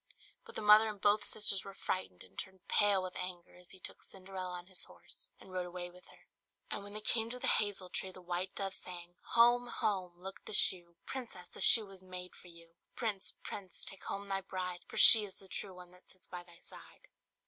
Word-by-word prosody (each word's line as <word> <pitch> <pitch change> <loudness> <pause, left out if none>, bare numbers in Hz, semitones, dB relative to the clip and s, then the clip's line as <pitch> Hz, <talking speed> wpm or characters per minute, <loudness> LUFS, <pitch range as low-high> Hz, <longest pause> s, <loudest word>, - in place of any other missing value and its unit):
But - - -13
the - - -4
mother 210 +1 +8
and 210 -2 -7
both 205 +2 +3
the - - -6
sisters 200 -2 +3
were 195 -1 -10
frightened 95 - -4
and 95 - -19
turned 190 -1 -7
pale 200 -2 +4
with 185 -1 -6
anger 180 -1 -7
as 180 0 -17
he 190 - -11
took - - -8
Cinderella 185 -1 -6
on 175 - -11
his 185 -1 -5
horse, - - -11
and 185 - -14
rode 180 -1 -3
away 175 0 -7
with 180 0 -18
her. - - -20 0.5
And 205 - -3
when 205 0 -9
they 215 - -2
came 225 +1 0
to 250 - -5
the - - -5
hazel 200 -3 +1
tree, 190 - -4
the 185 - -13
white 180 +1 -4
dove 195 -1 -3
sang 175 -1 -9 0.2
"Home! 240 +1 +5
home! 190 -6 -2
look 190 +2 -9
at - - -39
the - - -5
shoe! 175 -4 +4
Princess! 225 -9 -7
the - - -8
shoe 225 -2 +8
was 195 -2 -12
made 180 -1 -9
for - - -16
you! 170 -1 -16 0.2
Prince! 215 -5 -3
prince! 190 -4 -5
take 195 - -7
home 200 0 -5
thy 195 -1 -2
bride. 180 -2 -5
For - - -9
she 220 -2 +11
is 195 -2 -3
the 195 - -7
true 190 0 -6
one 180 -1 -13
that 180 0 -19
sits 185 - -15
by 180 -1 -8
thy 175 -1 -18
side!" - - -15
185 Hz, 235 wpm, -34 LUFS, 180-205 Hz, 0.5 s, she